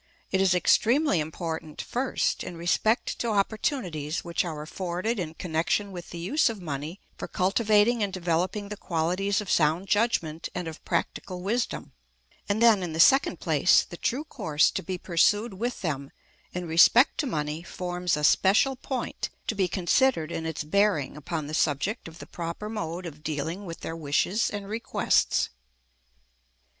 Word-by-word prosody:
It 190 - +2
is 190 -2 +4
extremely 235 - +3
important, 160 0 -5
first, 255 +2 -1
in 175 - -7
respect 195 +7 +1
to 235 - -1
opportunities 200 - -1
which 170 -1 -1
are 160 -4 -5
afforded 185 +7 -3
in 160 -3 -4
connection 175 +4 -1
with 175 -2 -8
the 175 - -7
use 215 - +2
of 225 -3 -5
money 155 +2 -5 0.2
for - - -4
cultivating 210 +4 +2
and 200 -1 0
developing 185 +3 -1
the 210 - -6
qualities 185 +5 0
of 205 - -5
sound 160 +4 +2
judgment 175 -8 0
and 180 -2 -3
of 160 - -8
practical 180 +1 -2
wisdom; 225 +5 -2 0.6
and 215 +3 +1
then, 225 -4 +6
in 175 -3 -4
the 160 - -4
second 270 +10 +5
place, - - +4
the - - -10
true 275 +5 -1
course 165 - +1
to - - -3
be 185 +2 -4
pursued 200 +6 +2
with 235 +5 -3
them 140 -6 -3 0.4
in 180 0 -4
respect 170 - +5
to 300 - 0
money 150 -5 -2
forms 180 -1 -2
a 150 - -4
special 200 - +4
point 255 -1 -4 0.2
to - - -1
be 195 -3 +1
considered 180 - +1
in 160 -1 -3
its 160 -1 -3
bearing 170 -4 +1
upon 150 +1 -4
the 150 - -7
subject 155 - 0
of 165 0 -11
the - - -9
proper 170 +5 -5
mode 180 -4 -4
of 150 -2 -9
dealing 160 +6 -3
with 165 - -7
their 165 - -5
wishes 165 +7 +1
and 205 -1 -5
requests. 225 +3 +1
180 Hz, 165 wpm, -27 LUFS, 160-210 Hz, 0.6 s, then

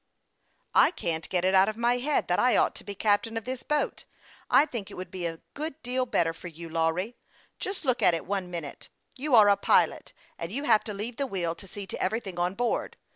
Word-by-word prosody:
" - - -44 0.3
I - - +6
can't 165 - -3
get 180 -1 0
it 190 - +3
out 190 +2 +6
of 215 - -5
my 240 +1 +2
head 290 +4 0
that - - +1
I - - +4
ought - - +3
to - - -9
be 200 - -7
captain 220 +3 +1
of 225 - -4
this 255 0 -4
boat. 300 -1 -1 0.4
I - - +6
think 235 -9 -6
it - - -10
would 185 - -7
be 180 -2 -3
a 165 -1 -7
good 305 0 -5
deal 255 +1 0
better 165 -7 +1
for 170 - -10
you, 165 0 -9
Lawry. 165 +7 -1 0.4
Just 385 -4 -5
look 255 -2 +1
at 170 - +5
it 165 - -5
one 195 -2 -2
minute! 170 -5 -7 0.3
You 275 0 +1
are 215 -2 +8
a 200 - +6
pilot, 200 - +2 0.3
and 165 +1 -5
you 275 +7 -3
have 225 -6 +4
to 210 - -4
leave 225 +4 -5
the 275 - -1
wheel 175 -7 -1
to 195 +3 -12
see 200 +2 -7
to - - -6
everything 190 -3 -2
on 180 +2 0
board. 240 +1 -1
205 Hz, 240 wpm, -28 LUFS, 175-245 Hz, 0.4 s, are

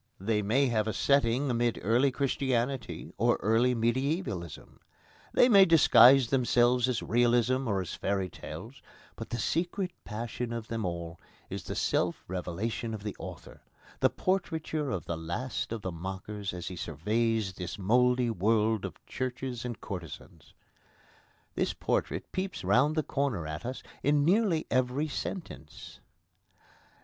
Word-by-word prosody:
They 105 +2 0
may 120 +8 +2
have 110 -4 +1
a 110 - -1
setting 135 0 +2
amid 120 -1 +1
early 120 +6 +3
Christianity 130 -2 -2
or - - +4
early 115 +4 +2
Mediævalism; 120 - -2 0.5
they 245 - +5
may 200 -5 +8
disguise 135 -7 +7
themselves 125 -1 +3
as 125 - -1
realism 120 +2 +2
or 100 -3 0
as 90 - -6
fairy 95 -1 -1
tales; - - -9 0.3
but - - -8
the 120 - -3
secret 175 - -1
passion 115 +2 -4
of 115 -1 -5
them 115 -3 -2
all 85 -1 -5 0.3
is - - -5
the - - -4
self - - 0
revelation 95 +6 -3
of 100 - -9
the 105 - -4
author - - -9 0.4
the - - +4
portraiture 160 -5 -1
of 95 -8 -3
the 85 - -3
last 95 +7 -4
of 115 -3 -4
the 95 - -2
mockers 95 +4 -5
as 90 -2 -6
he 90 - -7
surveys 110 +2 -1
this 90 -1 -6
mouldy 125 +4 +3
world 110 +1 +1
of - - -9
churches 125 -1 -4
and 120 -2 -5
courtesans. 85 -7 -9 1.0
This - - 0
portrait - - -2
peeps 190 0 -3
round 145 +5 +3
the 155 - +1
corner 135 - -1
at 80 +7 -5
us 130 - -5 0.2
in 145 +1 +3
nearly 185 -3 +2
every 130 +4 +1
sentence. 170 +4 -7
120 Hz, 145 wpm, -29 LUFS, 105-135 Hz, 1.0 s, may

